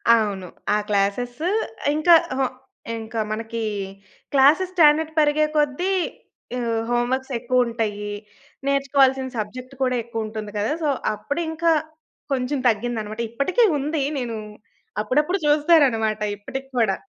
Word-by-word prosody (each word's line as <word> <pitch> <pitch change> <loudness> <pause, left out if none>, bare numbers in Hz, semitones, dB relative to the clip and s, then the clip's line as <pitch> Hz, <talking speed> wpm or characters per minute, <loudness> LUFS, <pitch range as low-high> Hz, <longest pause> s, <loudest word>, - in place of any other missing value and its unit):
అవును. 200 -4 -1 0.3
ఆ - - +3
క్లాస్సెస్సు 245 - 0 0.5
ఇంకా 335 +3 +5 0.2
అహా! 265 0 +1 0.5
ఇంకా 225 0 -5
మనకి 225 +1 -4 0.7
క్లాస్సెస్ 295 +7 +5
స్టాండర్డ్ 315 -2 +5
పెరిగే 300 0 +3
కొద్ది 295 +5 +1 0.7
ఆహ్, 230 -2 -1
హోమ్ 240 0 +1
వర్క్స్ 265 0 -3
ఎక్కువుంటాయి. 230 -4 0 0.6
నేర్చుకోవాల్సిన 270 -1 +3
సబ్జెక్ట్ 250 +5 -5
కూడా 255 -1 +2
ఎక్కువుంటుంది 220 -2 -5
కదా! 205 +4 0
సో, 295 - +2 0.2
అప్పుడింకా 320 +9 -1 0.6
కొంచెం 265 +2 -1
తగ్గిందన్నమాట. 220 -1 -2
ఇప్పటికి 280 - +1
ఉంది 295 +1 -1 0.2
నేను 235 -3 -3 0.6
అప్పుడప్పుడు 300 - +1
చూస్తానన్నమాట. 285 -9 +4 0.2
ఇప్పటికి 265 +6 -7
కూడా. 220 -5 +3
255 Hz, 110 wpm, -23 LUFS, 220-295 Hz, 0.7 s, ఇంకా